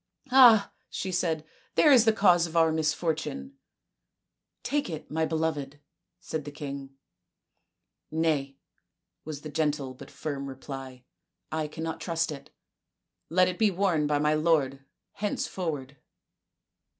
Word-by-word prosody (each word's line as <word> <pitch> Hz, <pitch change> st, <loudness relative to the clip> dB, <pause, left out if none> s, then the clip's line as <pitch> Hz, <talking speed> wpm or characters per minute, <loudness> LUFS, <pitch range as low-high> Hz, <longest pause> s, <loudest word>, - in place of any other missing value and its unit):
" -, -, -40 dB
Ah," 240 Hz, -6 st, +7 dB, 0.2 s
she 190 Hz, -, -4 dB
said, 165 Hz, -3 st, -1 dB
" -, -, -35 dB
there 300 Hz, -, +6 dB
is 245 Hz, -4 st, +7 dB
the 220 Hz, -, +6 dB
cause 180 Hz, -5 st, +4 dB
of 165 Hz, +1 st, -4 dB
our 165 Hz, -1 st, +5 dB
misfortune." 160 Hz, -, -2 dB, 0.5 s
" -, -, -57 dB
Take 290 Hz, -6 st, 0 dB
it, 155 Hz, -2 st, -7 dB
my 160 Hz, +1 st, 0 dB
beloved," 155 Hz, -3 st, -2 dB, 0.4 s
said 155 Hz, -4 st, -4 dB
the 145 Hz, -, -7 dB
king, 140 Hz, -2 st, -7 dB, 0.6 s
" -, -, -55 dB
Nay," 150 Hz, -4 st, 0 dB, 0.7 s
was 150 Hz, -2 st, -6 dB
the 155 Hz, -, -7 dB
gentle 145 Hz, -3 st, -1 dB
but 130 Hz, -, -12 dB
firm 140 Hz, -1 st, -5 dB
reply, 135 Hz, -1 st, -8 dB, 0.2 s
" 170 Hz, -, -58 dB
I 155 Hz, -1 st, -1 dB
cannot 160 Hz, +1 st, -5 dB
trust 165 Hz, -2 st, -1 dB
it. 140 Hz, -, -9 dB, 0.8 s
Let 185 Hz, +2 st, +4 dB
it 180 Hz, 0 st, -3 dB
be 220 Hz, -2 st, +5 dB
worn 180 Hz, -5 st, +1 dB
by 145 Hz, 0 st, +2 dB
my 150 Hz, +1 st, +2 dB
lord 150 Hz, -4 st, +1 dB, 0.3 s
henceforward." 160 Hz, -9 st, -3 dB
160 Hz, 145 wpm, -28 LUFS, 145-175 Hz, 0.8 s, Ah